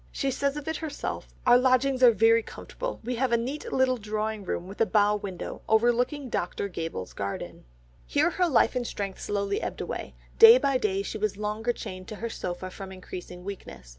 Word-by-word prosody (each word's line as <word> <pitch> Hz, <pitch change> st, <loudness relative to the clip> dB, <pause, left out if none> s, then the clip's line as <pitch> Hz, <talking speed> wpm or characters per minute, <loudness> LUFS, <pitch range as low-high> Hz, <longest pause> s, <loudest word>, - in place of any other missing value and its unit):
She 275 Hz, -2 st, -1 dB
says 280 Hz, +2 st, -1 dB
of 295 Hz, -, -7 dB
it 320 Hz, -, -1 dB
herself, 305 Hz, -3 st, -5 dB
"Our 245 Hz, 0 st, +7 dB
lodgings 260 Hz, +1 st, +2 dB
are 250 Hz, -, +9 dB
very 225 Hz, +1 st, +4 dB
comfortable, -, -, -6 dB
we 245 Hz, +1 st, -3 dB
have 255 Hz, 0 st, +1 dB
a 235 Hz, -, +4 dB
neat 260 Hz, +6 st, -4 dB
little 260 Hz, -1 st, +2 dB
drawing 215 Hz, -1 st, -3 dB
room 180 Hz, -1 st, -3 dB
with 195 Hz, +3 st, -7 dB
a -, -, +6 dB
bow 210 Hz, -1 st, +3 dB
window 195 Hz, -3 st, -6 dB
overlooking 240 Hz, +5 st, +2 dB
Dr. 190 Hz, -3 st, -2 dB
Gabell's 165 Hz, -, -5 dB
garden." 100 Hz, -9 st, -5 dB, 0.4 s
Here 345 Hz, -, +2 dB
her 360 Hz, 0 st, +1 dB
life 265 Hz, -5 st, +3 dB
and 245 Hz, -2 st, -1 dB
strength 195 Hz, -2 st, -5 dB
slowly 200 Hz, -1 st, -1 dB
ebbed -, -, -4 dB
away; -, -, -5 dB, 0.2 s
day 455 Hz, +1 st, +11 dB
by 275 Hz, -, +1 dB
day 195 Hz, -3 st, 0 dB
she 215 Hz, -, -5 dB
was 210 Hz, -1 st, -1 dB
longer 215 Hz, +3 st, -1 dB
chained 185 Hz, -5 st, -7 dB
to 215 Hz, -, -6 dB
her 230 Hz, +3 st, -4 dB
sofa 180 Hz, -1 st, -5 dB
from 190 Hz, 0 st, -8 dB
increasing 180 Hz, -1 st, -9 dB
weakness. 185 Hz, -, -8 dB
220 Hz, 195 wpm, -27 LUFS, 195-255 Hz, 0.4 s, day